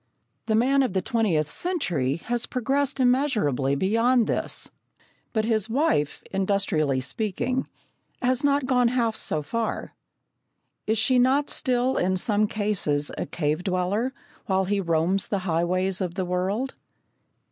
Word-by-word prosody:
The 220 Hz, -, +2 dB
man 265 Hz, +5 st, +3 dB
of 255 Hz, -8 st, 0 dB
the 190 Hz, -, +1 dB
twentieth 185 Hz, -11 st, +1 dB
century 180 Hz, -, 0 dB
has 240 Hz, 0 st, -1 dB
progressed 270 Hz, +3 st, -1 dB
immeasurably 225 Hz, -, +2 dB
beyond 230 Hz, -, +2 dB
this, -, -, -1 dB, 0.6 s
but 220 Hz, -2 st, 0 dB
his 220 Hz, -1 st, 0 dB
wife, 225 Hz, -, 0 dB
industrially 190 Hz, -8 st, +1 dB
speaking, 215 Hz, -, -2 dB, 0.5 s
has 255 Hz, +1 st, 0 dB
not 285 Hz, -1 st, +2 dB
gone 250 Hz, -2 st, +3 dB
half 235 Hz, -2 st, 0 dB
so 155 Hz, -7 st, -2 dB
far. 225 Hz, +8 st, -3 dB, 0.9 s
Is 220 Hz, +1 st, +2 dB
she 250 Hz, +3 st, +3 dB
not 270 Hz, +4 st, +3 dB
still 255 Hz, +1 st, +1 dB
in 185 Hz, +1 st, +1 dB
some 210 Hz, +2 st, +2 dB
cases 195 Hz, -10 st, 0 dB
a -, -, -4 dB
cave 155 Hz, +1 st, -1 dB
dweller, 195 Hz, +7 st, 0 dB, 0.4 s
while 190 Hz, 0 st, +1 dB
he 200 Hz, +1 st, 0 dB
roams 170 Hz, +2 st, +1 dB
the 200 Hz, -, -1 dB
highways 185 Hz, +3 st, 0 dB
of 180 Hz, -2 st, -3 dB
the 190 Hz, -2 st, -1 dB
world? 190 Hz, +9 st, -1 dB
210 Hz, 135 wpm, -25 LUFS, 180-250 Hz, 0.9 s, man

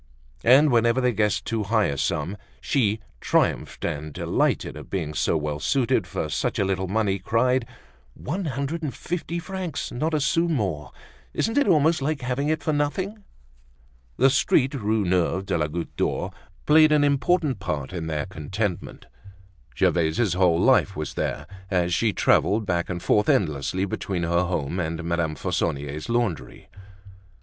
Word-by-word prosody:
And 135 Hz, +5 st, +6 dB
whenever 115 Hz, +1 st, +3 dB
they 125 Hz, -1 st, +2 dB
guessed 105 Hz, 0 st, 0 dB
too 115 Hz, -1 st, -1 dB
high 105 Hz, +1 st, +2 dB
a 70 Hz, -, -1 dB
sum, 75 Hz, +7 st, -1 dB, 0.2 s
she 110 Hz, -7 st, 0 dB, 0.2 s
triumphed -, -, 0 dB
and 75 Hz, +1 st, -3 dB
delighted -, -, 0 dB
at -, -, -10 dB
being 80 Hz, -6 st, -3 dB
so 80 Hz, -, +1 dB
well 75 Hz, -1 st, -3 dB
suited 130 Hz, -, +1 dB
for -, -, -3 dB
such -, -, -2 dB
a 100 Hz, -, +1 dB
little 95 Hz, -1 st, -1 dB
money, 100 Hz, 0 st, 0 dB
cried: 120 Hz, +5 st, +1 dB, 0.5 s
"One 180 Hz, +7 st, -4 dB
hundred 140 Hz, +3 st, -3 dB
and 150 Hz, -4 st, -4 dB
fifty 170 Hz, 0 st, -4 dB
francs, 180 Hz, -2 st, -4 dB
not 155 Hz, +6 st, -1 dB
a -, -, +2 dB
sou 165 Hz, +4 st, +2 dB
more! 95 Hz, -, -2 dB, 0.4 s
Isn't 225 Hz, -, 0 dB
it 285 Hz, -4 st, +3 dB
almost 160 Hz, -3 st, +3 dB
like 145 Hz, 0 st, -1 dB
having 130 Hz, +4 st, -1 dB
it 155 Hz, -, -1 dB
for 155 Hz, -, 0 dB
nothing!" 185 Hz, +9 st, -2 dB, 0.9 s
The 135 Hz, +2 st, +5 dB
street, 135 Hz, +1 st, +2 dB
Rue 110 Hz, -5 st, 0 dB
Neuve 90 Hz, +1 st, +1 dB
de -, -, -1 dB
la 75 Hz, -2 st, +1 dB
Goutte 85 Hz, +2 st, -5 dB
d'Or, -, -, -1 dB, 0.3 s
played 155 Hz, 0 st, +6 dB
an 150 Hz, -1 st, +4 dB
important 145 Hz, -, +1 dB
part 75 Hz, -7 st, -4 dB
in 85 Hz, -3 st, -4 dB
their 75 Hz, -2 st, -2 dB
contentment. 95 Hz, +2 st, -4 dB, 0.7 s
Gervaise's 85 Hz, +4 st, +2 dB
whole 90 Hz, -2 st, +3 dB
life 100 Hz, -3 st, +3 dB
was 75 Hz, -2 st, -4 dB
there, 75 Hz, -, -3 dB, 0.2 s
as 90 Hz, -2 st, +1 dB
she 110 Hz, +4 st, +2 dB
traveled 105 Hz, +2 st, +2 dB
back 85 Hz, -2 st, -1 dB
and 85 Hz, -2 st, -4 dB
forth 105 Hz, -1 st, +2 dB
endlessly 85 Hz, +2 st, +1 dB
between 95 Hz, -2 st, -3 dB
her 85 Hz, +2 st, +1 dB
home 90 Hz, -1 st, -2 dB
and 85 Hz, 0 st, -3 dB
Madame 85 Hz, -2 st, -1 dB
Fauconnier's 70 Hz, +4 st, -2 dB
laundry. 115 Hz, -8 st, -2 dB
105 Hz, 160 wpm, -24 LUFS, 85-140 Hz, 0.9 s, And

